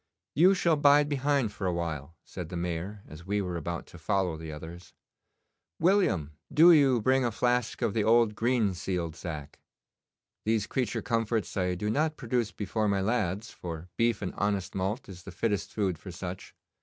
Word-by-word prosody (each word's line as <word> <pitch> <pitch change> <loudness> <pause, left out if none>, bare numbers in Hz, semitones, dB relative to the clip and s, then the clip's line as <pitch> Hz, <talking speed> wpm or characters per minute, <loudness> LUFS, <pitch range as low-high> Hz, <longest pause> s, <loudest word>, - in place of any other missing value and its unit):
'You 185 +6 +5
shall 170 -4 +2
bide 145 0 +5
behind 140 -4 +1
for 95 -2 -3
a - - +2
while,' 85 -2 -4
said 90 -4 -7
the 90 - -4
Mayor, 90 +4 -4
as 75 +2 -11
we 105 +1 +1
were 90 -3 -3
about 85 +1 -4
to 85 - -14
follow 90 0 0
the 80 0 -7
others. 80 +4 -10 0.8
'William, 165 - +2 0.2
do 170 +3 +8
you 140 -6 +5
bring 130 +4 +3
a 120 - +2
flask 125 +1 0
of 115 -4 +1
the 110 - +1
old 115 0 +4
green 115 -2 +1
sealed 85 -2 -3
sack. 75 -5 -7 0.8
These 110 -1 +1
creature 125 -6 -2
comforts 115 -2 -1
I 90 -1 0
do 105 +4 -2
not 155 +5 0
produce 120 -3 -1
before 105 +1 -2
my 100 -1 +1
lads, 105 -1 -1
for 85 0 -7
beef 115 -2 +1
and 90 - -3
honest 100 -2 -1
malt 95 +7 -2
is 95 -3 -10
the - - -10
fittest 105 -4 -1
food 95 -6 -1
for 95 - -10
such. 90 +1 -7
100 Hz, 180 wpm, -29 LUFS, 90-120 Hz, 0.8 s, do